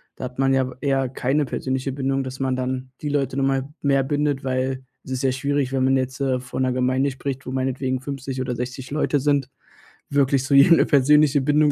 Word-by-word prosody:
da - - -6
hat 125 0 -9
man 135 0 +3
ja 130 -1 +1
eher 135 -2 +1
keine 135 +4 0
persönliche 130 +1 -2
Bindung, 135 0 -1
dass 130 0 -7
man 130 -1 0
dann 130 0 -3
die 150 - -2
Leute 140 -2 -1
nun 135 - +2
mal 135 0 -1
mehr 135 -1 +2
bindet, 145 0 -1
weil 130 0 -1 0.2
es 130 - -10
ist 130 0 -2
ja 130 - +3
schwierig, 140 0 -1
wenn 130 -1 +1
man 135 0 +3
jetzt, 130 +1 -3
äh, 130 -2 +1
vor 125 0 -7
'ner 130 -1 +1
Gemeinde 130 +2 +1
spricht, 135 0 -5
wo - - -5
meinetwegen 130 0 -1
50 135 -1 -5
oder 125 -1 -2
60 125 +2 -6
Leute 150 0 +1
sind, 140 -1 +1 0.6
wirklich 140 -1 +2
zu 130 - -1
jedem 140 +5 +7
'ne - - +4
persönliche 145 0 +4
Bindung 150 +2 +3
135 Hz, 220 wpm, -23 LUFS, 130-140 Hz, 0.6 s, jedem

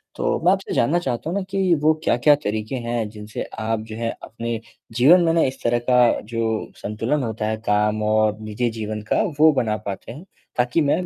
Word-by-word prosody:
तो - - 0
मैं 180 - +6
आपसे 195 0 -1
जानना 150 +9 +2
चाहता 130 -1 -3
हूँ 180 - -1
ना 200 - -1
कि 190 -2 +2
वो 155 +1 +5
क्या-क्या 145 +5 +4
तरीक़े 110 +2 -2
हैं 120 -2 -1
जिनसे 105 0 -7 0.2
आप 110 0 -1
जो 110 - -6
है 115 0 -2
अपने 115 0 -4 0.4
जीवन 150 +10 +6
में 165 -1 +2
ना 165 - +3
इस 135 0 -2
तरह 120 0 +2
का 125 - +5 0.2
जो 115 +2 -3 0.3
संतुलन 115 +7 -2
होता 110 -2 -3
है 110 0 -1
काम 105 +1 +2
और 110 0 +2
निजी 110 +3 -2
जीवन 110 0 -4
का - - +3 0.2
वो 155 +1 +7
बना 110 -5 0
पाते 100 +2 -6
हैं, 145 +8 -10 0.3
ताकि 125 +6 +2
मैं 150 +5 +1
115 Hz, 205 wpm, -22 LUFS, 110-150 Hz, 0.4 s, वो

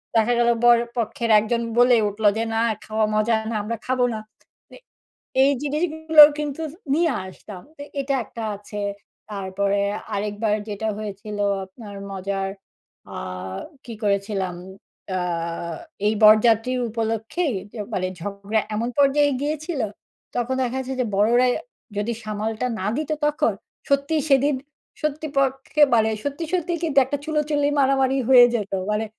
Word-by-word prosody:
দেখা 225 +2 +4
গেল 235 0 +4
বরপক্ষের 235 -1 +2
একজন 235 +2 -1 0.2
বলে 245 0 +6
উঠলো 205 +1 0
যে, 225 - 0
"না, 225 - +1 0.3
খাওয়া 215 0 +1
মজা 215 +2 +2
না। 230 - -3
আমরা 230 +2 -3
খাবো 255 -1 +2
না।" 220 - -4 0.5
মানে, - - -15 0.7
এই 275 - +5
জিনিসগুলো 315 +1 +4 0.2
কিন্তু 295 +1 -3 0.3
নিয়ে 330 +1 +2
আসতাম। 185 0 -10 0.2
তো 285 - -9 0.2
এটা 275 0 -2
একটা 230 +2 -8
আছে। 205 +1 -8 0.5
তারপরে 200 0 -1 0.3
আরেকবার 210 +1 -1
যেটা 210 +1 -3
হয়েছিল 210 0 -6 0.3
আপনার 200 +1 -11 0.2
মজার 195 0 -3 0.6
অ্যা - - -8 0.7
কি 235 - -7
করেছিলাম? 200 -2 -1 0.5
অ্যা 185 -1 -1 0.9
এই 215 - +3
বরযাত্রীর 225 +3 +5
উপলক্ষেই 225 +7 -1 0.2
যে, - - -11 0.2
মানে 185 -2 0
ঝগড়া 200 +3 -2
এমন 230 +3 -1
পর্যায়ে 285 +1 +4
গিয়েছিল, 305 0 -2 0.5
তখন 245 +2 0
দেখা 255 0 -1
গেছে 265 +1 -5
যে, - - 0
বড়রাই 240 +5 +4 0.4
যদি 215 +3 -1
সামালটা 215 +3 -2
না 190 - -2
দিত 310 0 -3
তখন, 295 0 +1 0.4
সত্যিই 280 +3 +2
সেদিন 275 +1 +4 0.5
সত্যি 305 +1 -2
পক্ষে 270 +2 +1
মানে 220 -1 +4
সত্যি, 285 +3 -3
সত্যি 350 -1 0
কিন্তু 310 -5 -2
একটা 285 +3 -2
চুলোচুলি 300 -2 0
মারামারি 270 0 +3
হয়ে 245 -2 +9
যেতো। 205 -3 -2 0.2
মানে 210 +1 0
235 Hz, 140 wpm, -23 LUFS, 210-280 Hz, 0.9 s, হয়ে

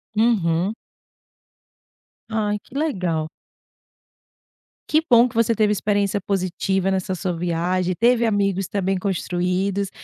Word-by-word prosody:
Uhum. 200 -4 +2 1.6
Ai, 210 -2 0
que 250 - -19
legal. 180 - -1 1.6
Que 310 - +4
bom 240 +1 +6
que 225 - -17
você 230 0 +2
teve 210 -1 +2
experiência 205 0 0
positiva 190 0 -1
nessa 190 0 -1
sua 185 +1 -2
viagem, 175 +2 -1
teve 235 +1 +3
amigos 195 -3 0
também 195 -1 -1
construídos, 190 +1 -1
195 Hz, 110 wpm, -22 LUFS, 180-215 Hz, 1.6 s, bom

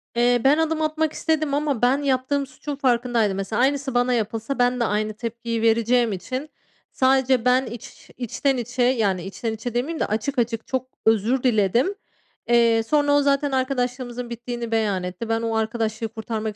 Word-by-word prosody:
Eee, 240 0 +3
ben 280 +3 +5
adım 320 0 0
atmak 310 0 0
istedim 310 -3 0
ama 285 -4 0
ben 250 +3 +4
yaptığım 275 0 0
suçun 280 +3 -6
farkındaydım 240 -6 +1
mesela. 205 +4 -1
Aynısı 275 0 +1
bana 245 +1 +2
yapılsa, 225 +3 -2
ben 245 0 +2
de - - +2
aynı 215 0 -1
tepkiyi 230 +1 -4
vereceğim 230 +1 +3
için 255 - -5 0.4
sadece 260 -2 +2
ben 255 +1 +4
iç 235 -1 -10
içten 260 +3 -1
içe 245 +1 -1
yani, 215 -8 +1
içten 205 +4 -4
içe 225 +2 -5
demeyeyim 280 +7 -2
de - - +1
açık 225 +6 -2
açık 230 -1 -1
çok 260 -1 -2 0.2
özür 225 +4 +2
diledim. 240 - +2 0.5
Eee, 230 -1 +4
sonra 290 +4 +2
o 290 0 +5
zaten 280 0 +1
arkadaşlığımızın 250 -2 -2
bittiğini 235 0 -5
beyan 210 -5 0
etti. 180 +5 -5
Ben 225 0 +1
o 225 -1 -1
arkadaşlığı 220 0 -1
kurtarmak 220 -1 -4
245 Hz, 170 wpm, -23 LUFS, 225-265 Hz, 0.5 s, ben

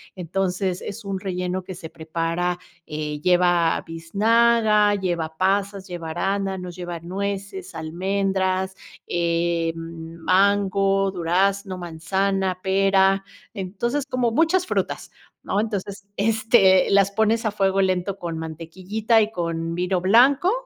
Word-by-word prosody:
entonces 185 +1 -2
es 215 +3 -7
un 195 -1 -3
relleno 185 -1 -3
que 185 - -7
se 170 -2 -9
prepara 165 +2 -2 0.3
eh, 150 -1 -4
lleva 175 -1 +3
biznaga, 210 +5 +3
lleva 170 -5 -2
pasas, 195 +1 0
lleva 170 -2 -5
arándanos, 190 0 -2
lleva 175 -1 -5
nueces, 195 +1 -5
almendras, 190 +3 -1 0.3
eh 170 -1 0
mango, 190 +4 +1
durazno, 190 +2 0
manzana, 185 +2 -1
pera, 195 0 +3 0.3
entonces 230 +8 -2
como 250 -2 +1
muchas 330 +8 +2
frutas, - - -2 0.3
¿no? 200 - -1
Entonces, 200 -2 -4
este, 215 -3 +4
las 200 0 +4
pones 220 +2 +1
a 215 - +1
fuego 195 -1 +1
lento 190 +1 0
con 170 -2 -4
mantequillita 185 +8 -1
y 215 0 0
con 165 -3 -3
vino 180 +1 0
blanco 260 - +5
190 Hz, 115 wpm, -23 LUFS, 175-200 Hz, 0.3 s, blanco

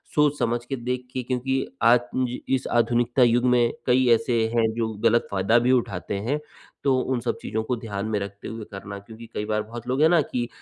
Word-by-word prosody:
सोच-समझ 140 -6 +2
के 135 - -3
देख 125 0 -4
के 130 - -2
क्योंकि 130 +2 -1 0.2
आज 120 +1 +6 0.2
ज 125 -1 -1 0.2
इस 130 - -3
आधुनिकता 120 +2 +3
युग 120 +1 +3
में 120 -1 +3
कई 125 0 +3
ऐसे 120 -2 +1
हैं 110 -1 +3
जो 115 -1 -1
गलत 115 +1 +3
फायदा 100 +4 +3
भी 125 +2 +2
उठाते 100 -5 -1
हैं 150 +1 +1 0.4
तो 135 -2 +3
उन 130 0 -1
सब 120 - -2
चीज़ों 110 0 -2
को 125 - -1
ध्यान 105 -3 -4
में 110 -1 -1
रखते 100 0 -7
हुए 115 -2 -6
करना, 100 +1 -7
क्योंकि 110 +3 -12
कई 105 - -3
बार 105 0 0
बहुत 120 +2 -9
लोग 130 +3 0
है 160 - +7
ना 170 -3 +5
कि 120 -3 -3
120 Hz, 215 wpm, -24 LUFS, 110-125 Hz, 0.4 s, है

